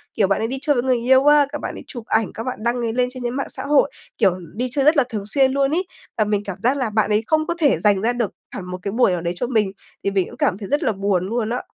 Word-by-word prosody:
Kiểu, 200 Hz, -4 st, +3 dB
bạn 195 Hz, -, +1 dB
ấy 225 Hz, -, 0 dB
đi 260 Hz, +3 st, -4 dB
chơi 290 Hz, 0 st, +2 dB
với 245 Hz, -, +1 dB
người 255 Hz, -1 st, +2 dB
yêu 260 Hz, +3 st, +4 dB
á, 295 Hz, -1 st, +6 dB
các 295 Hz, -, -4 dB
bạn -, -, -4 dB
ấy -, -, -9 dB
chụp 240 Hz, -4 st, -8 dB
ảnh, 220 Hz, -2 st, 0 dB
các 225 Hz, -, -5 dB
bạn 250 Hz, -3 st, -5 dB
đăng 235 Hz, +1 st, +1 dB
ấy 230 Hz, -1 st, -1 dB
lên 250 Hz, +1 st, +1 dB
trên 255 Hz, -1 st, -8 dB
những 240 Hz, +1 st, -2 dB
mạng 275 Hz, -, -3 dB
xã -, -, -7 dB
hội, 290 Hz, 0 st, +3 dB, 0.3 s
kiểu, 190 Hz, -5 st, +2 dB, 0.2 s
đi 250 Hz, +4 st, -1 dB
chơi 275 Hz, 0 st, 0 dB
rất 305 Hz, +2 st, +5 dB
là 280 Hz, -, +5 dB
thường 210 Hz, -4 st, -4 dB
xuyên 265 Hz, +5 st, +2 dB
luôn 275 Hz, +1 st, +1 dB
ấy, 360 Hz, +3 st, 0 dB, 0.3 s
và 215 Hz, -, +3 dB
mình 205 Hz, -1 st, -1 dB
cảm 195 Hz, -2 st, -5 dB
giác 265 Hz, +4 st, +2 dB
là 250 Hz, -5 st, -1 dB
bạn 215 Hz, 0 st, +1 dB
ấy 210 Hz, +1 st, +2 dB
không 310 Hz, 0 st, +1 dB
có 340 Hz, -, 0 dB
thể 290 Hz, -5 st, +3 dB
dành 205 Hz, -2 st, +3 dB
ra 240 Hz, +2 st, +1 dB
được 235 Hz, -5 st, -1 dB, 0.2 s
hẳn 185 Hz, -, -6 dB
một 180 Hz, 0 st, -5 dB
cái 200 Hz, -, -3 dB
buổi 230 Hz, -2 st, +3 dB
nào 175 Hz, -2 st, -1 dB
đấy 170 Hz, +1 st, -2 dB
cho 245 Hz, -, -2 dB
mình, 215 Hz, -6 st, +1 dB, 0.3 s
thì 200 Hz, -, 0 dB
mình 195 Hz, -2 st, +1 dB
cũng -, -, -12 dB
cảm 185 Hz, -, +1 dB
thấy 200 Hz, -2 st, -8 dB
rất 290 Hz, -, +1 dB
là -, -, +2 dB
buồn 195 Hz, -3 st, 0 dB
luôn 230 Hz, -1 st, -1 dB
á. 245 Hz, +2 st, -2 dB
235 Hz, 325 wpm, -21 LUFS, 205-265 Hz, 0.3 s, á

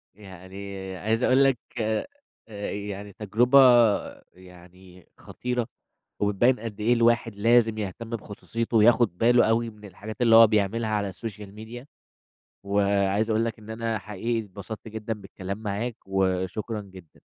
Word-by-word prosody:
يعني 95 Hz, 0 st, -10 dB, 0.2 s
عايز 110 Hz, +5 st, -1 dB
أقول 130 Hz, +2 st, +4 dB
لك 135 Hz, -3 st, +3 dB, 0.2 s
آآ 110 Hz, 0 st, -1 dB, 0.7 s
يعني 100 Hz, 0 st, -6 dB
تجربة، 120 Hz, +7 st, +3 dB, 0.7 s
يعني 90 Hz, 0 st, -17 dB
خطيرة، 125 Hz, -1 st, -4 dB, 0.5 s
وبتبين 105 Hz, +5 st, +2 dB
قد 110 Hz, -2 st, -7 dB
إيه 120 Hz, +3 st, +3 dB
الواحد 115 Hz, -2 st, +2 dB
لازم 115 Hz, +1 st, +3 dB
يهتم 110 Hz, +2 st, -5 dB
بخصوصيته 115 Hz, +1 st, -3 dB
وياخد 115 Hz, -4 st, +4 dB
باله 120 Hz, +1 st, +4 dB
أوي 115 Hz, +1 st, +1 dB
من 105 Hz, -1 st, -14 dB
الحاجات 105 Hz, +4 st, -9 dB
اللي 115 Hz, -2 st, +5 dB
هو 115 Hz, 0 st, +9 dB
بيعملها 110 Hz, +1 st, 0 dB
على 105 Hz, -2 st, -1 dB
الSocial 105 Hz, -3 st, -8 dB
media، 120 Hz, +4 st, -9 dB, 0.8 s
وعايز 100 Hz, +1 st, +1 dB
أقول 110 Hz, +1 st, +2 dB
لك 115 Hz, -2 st, -4 dB
إن 110 Hz, 0 st, -12 dB
أنا 115 Hz, -1 st, -2 dB
حقيقي 110 Hz, +4 st, -3 dB
اتبسطت 105 Hz, +3 st, -9 dB
جدًا 110 Hz, +1 st, -5 dB
بالكلام 100 Hz, -1 st, -7 dB
معاك، 110 Hz, +2 st, -4 dB
وشكرًا 95 Hz, +3 st, -1 dB
جدًا. 95 Hz, -5 st, -15 dB
110 Hz, 135 wpm, -25 LUFS, 100-115 Hz, 0.8 s, هو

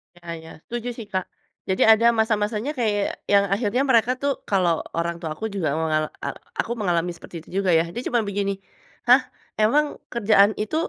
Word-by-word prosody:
Iya 175 Hz, 0 st, -17 dB
iya, 160 Hz, 0 st, -12 dB, 0.2 s
setuju 240 Hz, 0 st, -4 dB
sih 230 Hz, -, -7 dB
Kak. 185 Hz, -1 st, 0 dB, 0.5 s
Jadi 190 Hz, -, 0 dB
ada 220 Hz, +1 st, +5 dB
masa-masanya 215 Hz, +2 st, 0 dB
kayak 210 Hz, -3 st, +1 dB, 0.3 s
yang 200 Hz, 0 st, +6 dB
akhirnya 215 Hz, +4 st, 0 dB
mereka 235 Hz, 0 st, +4 dB
tuh 280 Hz, -, +1 dB, 0.2 s
kalau 185 Hz, -4 st, +3 dB, 0.2 s
orang 170 Hz, 0 st, -1 dB
tua 165 Hz, -2 st, -4 dB
aku 220 Hz, -, -5 dB
juga 190 Hz, -6 st, -1 dB
aku 160 Hz, -, -1 dB
mengal 155 Hz, -1 st, +1 dB, 0.2 s
a -, -, -1 dB, 0.3 s
aku -, -, 0 dB
juga 235 Hz, -, -9 dB
mengalami 175 Hz, -2 st, +1 dB
seperti 170 Hz, -, -13 dB
itu -, -, -19 dB
juga 195 Hz, -1 st, +1 dB
ya. 160 Hz, -, +3 dB
Dia 240 Hz, -, -4 dB
cuma 240 Hz, -2 st, +2 dB
begini, 200 Hz, 0 st, -1 dB, 0.6 s
"Hah, 250 Hz, +2 st, +7 dB, 0.4 s
emang 290 Hz, +8 st, +4 dB, 0.3 s
kerjaan 210 Hz, -3 st, +5 dB
itu 215 Hz, +8 st, -3 dB
205 Hz, 195 wpm, -23 LUFS, 180-230 Hz, 0.6 s, Hah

